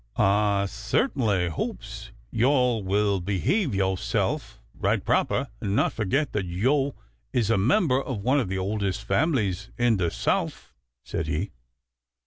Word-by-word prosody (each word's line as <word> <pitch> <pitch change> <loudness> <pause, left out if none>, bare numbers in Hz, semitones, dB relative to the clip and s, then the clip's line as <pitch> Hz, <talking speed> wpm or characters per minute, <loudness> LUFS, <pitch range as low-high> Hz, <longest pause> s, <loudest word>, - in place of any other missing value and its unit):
"Ah 100 0 +3
cert'nly 105 - 0
hopes 80 - -5 0.2
yo'all 125 -2 +2
will 100 +1 +1
behave 100 - 0
yo'self 95 -1 -1
right - - 0
proper - - +1
and 100 -1 -1
not - - +2
forget 130 +8 0
that 100 -3 -1
yo' 135 +10 +1 0.4
is 115 -3 +2
a 115 - +3
member 135 - +3
of 120 -8 -5
one 130 +5 +3
of 115 -9 -1
the 95 - -2
oldest 100 0 -2
families 105 - 0
in 120 -3 +3
the 90 -2 +1
Souf," - - -2 0.3
said 80 - -3
he. 80 +7 -2
105 Hz, 135 wpm, -26 LUFS, 95-130 Hz, 0.4 s, Ah